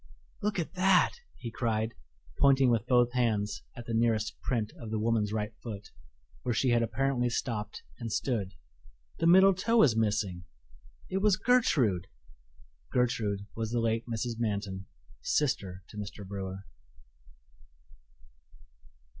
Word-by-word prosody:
"Look 210 0 -1
at 170 0 -3
that!" 185 0 +4 0.3
he 120 -2 -6
cried, 110 -1 -1 0.5
pointing 135 -2 +5
with 115 -3 0
both 120 -1 +4
hands 105 -5 0 0.2
at 120 - -7
the 115 - -4
nearest 110 -2 +1
print 115 -4 -1
of 115 - -7
the 110 - -1
woman's 110 -1 +1
right 105 0 -2
foot, 105 -4 -7 0.5
where 120 -2 -1
she 130 - +2
had 120 -1 +4
apparently 125 +1 0
stopped 110 -3 -3 0.2
and 115 - -4
stood. 100 -8 -1 0.6
"The 165 - +2
middle 190 +3 +7
toe 225 +5 +3
is 125 -7 +4
missing 105 -5 0 0.6
it 190 - -2
was 200 -1 +3
Gertrude!" 130 - +2 0.8
Gertrude 110 -5 0
was 115 -1 -2
the 120 +1 0
late 115 0 0
Mrs. 115 0 -3
Manton, 100 -4 -2 0.3
sister 95 - 0
to 105 - -11
Mr. 105 -1 -7
Brewer. 95 0 -6
115 Hz, 135 wpm, -30 LUFS, 105-125 Hz, 0.8 s, middle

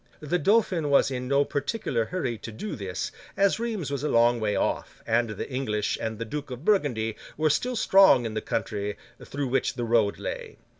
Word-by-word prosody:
The 155 +4 -1
Dauphin 190 -7 +2
was 140 -1 +4
in 125 -1 -3
no 140 +1 +3
particular 145 - -1
hurry 135 -8 -2
to 115 - -7
do 155 - -5
this, 95 -6 -4 0.3
as 200 +2 +3
Rheims 220 - -3
was 140 -2 -2
a 150 - 0
long 120 +1 +4
way 105 -2 0
off, - - -2
and 115 0 +1
the 105 - -5
English 110 -6 -1
and 110 -1 -3
the 115 - -4
Duke 145 +5 -5
of 125 +4 -8
Burgundy 125 - +1 0.2
were 155 0 +3
still 250 - 0
strong 195 - +6
in 110 - -3
the 110 - -2
country 105 -1 -3 0.3
through 140 -2 -3
which 135 0 0
the 120 -1 -2
road 115 -3 +2
lay. - - -6
130 Hz, 200 wpm, -26 LUFS, 115-155 Hz, 0.3 s, strong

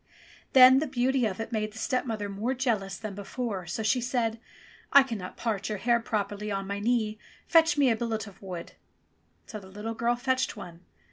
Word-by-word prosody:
Then 260 0 +9
the 310 - -1
beauty 260 -1 +1
of 190 -1 -5
it 225 +1 -5
made 215 -2 -2
the - - -12
stepmother 225 -4 -2
more 210 +6 -2
jealous 215 -7 -1
than 215 -2 -6
before, 205 -2 -4
so 220 +6 -3
she 235 +4 +2
said, 235 -2 -1 0.5
"I 280 - +8
cannot 215 -8 -6
part 215 -4 -2
your 210 - -2
hair 235 +3 +2
properly 210 -2 -3
on 195 -1 -2
my 200 +1 -3
knee, 215 -1 0 0.3
fetch 325 -2 +4
me 275 -4 +4
a - - +2
billet 220 -1 -2
of 195 -2 -14
wood." 180 -3 -7 0.7
So 215 - -7
the 190 - -14
little 210 +4 -5
girl 235 +2 +1
fetched 260 +1 -1
one. 170 -1 -9
225 Hz, 195 wpm, -28 LUFS, 205-245 Hz, 0.7 s, Then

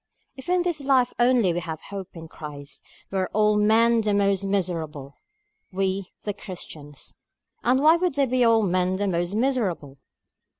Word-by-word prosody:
"If 265 +5 -10
in 360 -1 +2
this 345 -4 -1
life 265 -3 +2
only 240 -7 +3
we 175 - -1
have 160 -3 -6
hope 195 -2 -6
in 165 0 -9
Christ, 145 -3 -9 0.3
we 195 - -1
are 185 - +1
of - - -11
all 210 0 +3
men 225 +2 +4
the 210 -1 0
most 200 -1 +2
miserable;" 165 -8 -2 0.6
we, 190 0 -2
the 205 - -2
Christians. 155 -7 -8 0.4
And 260 +3 +2
why 320 +2 +6
would 350 -4 -1
they 280 -1 +3
be 255 0 0
of 235 - +5
all 225 -1 +4
men 185 -1 +1
the 200 +1 -1
most 175 +1 -1
miserable? 205 - -1
200 Hz, 180 wpm, -24 LUFS, 175-240 Hz, 0.6 s, why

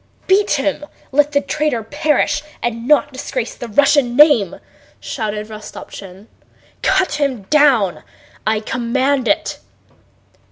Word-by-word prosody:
"Beat 400 +2 +3
him!... 295 +1 -1 0.2
Let 295 +2 +3
the 285 -1 +2
traitor 300 -8 -1
perish 290 +3 0 0.2
and 235 0 -3
not 290 -1 +3
disgrace 255 -2 -4
the 240 - -8
Russian 275 +1 +3
name!" 270 - +5 0.4
shouted 215 -3 -4
Rostopchín. 200 -2 -10 0.6
"Cut 375 -6 +1
him 260 -7 -1
down. 270 - +3 0.5
I 215 0 +1
command 255 +3 0
it." 205 - 0
265 Hz, 115 wpm, -18 LUFS, 225-295 Hz, 0.6 s, name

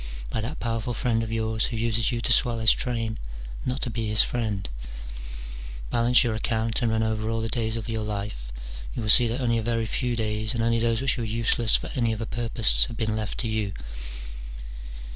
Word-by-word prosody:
by 110 - -1
that 125 +8 -4
powerful 115 0 -2
friend 115 0 +1
of 110 -1 -3
yours, 110 0 +1
who 115 - -4
uses 115 +1 +1
you 120 - -1
to 120 - +1
swell 120 0 +3
his 110 -1 +5
train, 115 -3 -1 0.5
not 130 +2 -1
to 125 - -1
be 115 -1 -2
his 105 0 +6
friend? 110 -5 -2 1.2
Balance 120 +1 +5
your 120 -2 +1
account, 110 +1 0
and 120 - +2
run 110 0 +2
over 110 0 -1
all 115 0 0
the 115 0 -2
days 110 -1 -1
of 115 - -5
your 110 -1 -2
life; 100 - -4 0.4
you - - -2
will 110 - -2
see 120 +1 +7
that 115 +3 -2
only 115 -2 +2
a - - -1
very 115 0 0
few 120 +2 -1
days, 110 0 -1
and 115 - 0
only 115 0 +3
those 115 +1 +1
which 135 -1 +1
were - - -1
useless 115 +1 +2
for - - -1
any 115 -5 +1
other 115 +1 -4
purpose, 115 -1 +4
have 115 -2 -7
been 110 -2 0
left 110 -1 -3
to 120 - -2
you. 110 -3 -1
115 Hz, 215 wpm, -26 LUFS, 110-120 Hz, 1.2 s, see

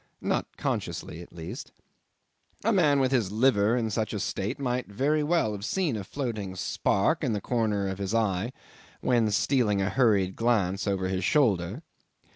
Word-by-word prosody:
Not - - -2
consciously, 85 - -3
at 85 - -12
least. 85 -1 -8 0.9
A 225 +2 +2
man 150 -7 +4
with 130 -1 +2
his 115 -8 +1
liver 110 -1 +3
in 110 -2 -1
such 110 +1 -1
a 105 - -2
state 100 +5 -2
might 125 -2 -2
very 140 +9 +1
well 150 -7 +1
have 100 -1 -6
seen 165 - 0
a 105 - -4
floating 105 -5 -4
spark 100 - +1
in 125 -6 +1
the 105 - -1
corner 105 -3 0
of 95 0 -4
his 100 +2 -2
eye 110 0 0 0.5
when 120 -3 +2
stealing 105 -1 +2
a 95 -1 0
hurried 100 -6 +2
glance 100 -4 +1
over 95 -2 0
his 95 0 -2
shoulder. 105 - +1
110 Hz, 170 wpm, -27 LUFS, 100-130 Hz, 0.9 s, man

